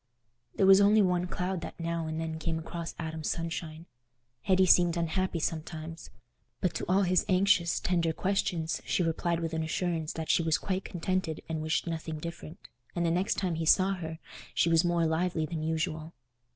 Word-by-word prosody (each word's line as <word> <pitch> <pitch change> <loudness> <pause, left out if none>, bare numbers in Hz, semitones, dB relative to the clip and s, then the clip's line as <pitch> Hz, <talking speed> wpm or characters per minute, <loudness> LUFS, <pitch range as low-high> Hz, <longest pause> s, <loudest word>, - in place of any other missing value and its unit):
There 195 - +3
was 195 +1 +8
only 205 +1 +5
one 180 -1 +1
cloud 180 0 -2
that - - -8
now 165 -1 -2
and 160 0 -3
then 160 0 -4
came 160 0 -2
across 165 +1 -6
Adam's 160 -2 -4
sunshine: 165 -1 -4 0.6
Hetty 190 -1 +3
seemed 175 -1 +5
unhappy 170 +2 -1
sometimes. 160 0 -4 0.5
But 180 -2 0
to - - -3
all 195 +2 +4
his 180 -1 +3
anxious, 185 -3 +3
tender 170 -2 +1
questions, 170 -2 -1
she 180 - 0
replied 170 +1 0
with 165 -1 -3
an 160 - -1
assurance 160 0 -2
that 160 -1 -1
she - - +3
was 160 -1 +2
quite 190 -1 -3
contented 180 -2 -2
and 160 -1 -3
wished 155 +1 0
nothing 160 -2 -4
different; 170 +2 -8 0.3
and 170 -1 0
the 165 - +2
next 180 +4 +1
time 185 -3 -1
he 160 0 -2
saw 190 +3 +5
her 160 -3 -5 0.4
she 170 - +3
was 165 0 +4
more 175 -1 +2
lively 160 0 0
than 160 0 -4
usual. 160 0 -2
170 Hz, 185 wpm, -29 LUFS, 160-180 Hz, 0.6 s, was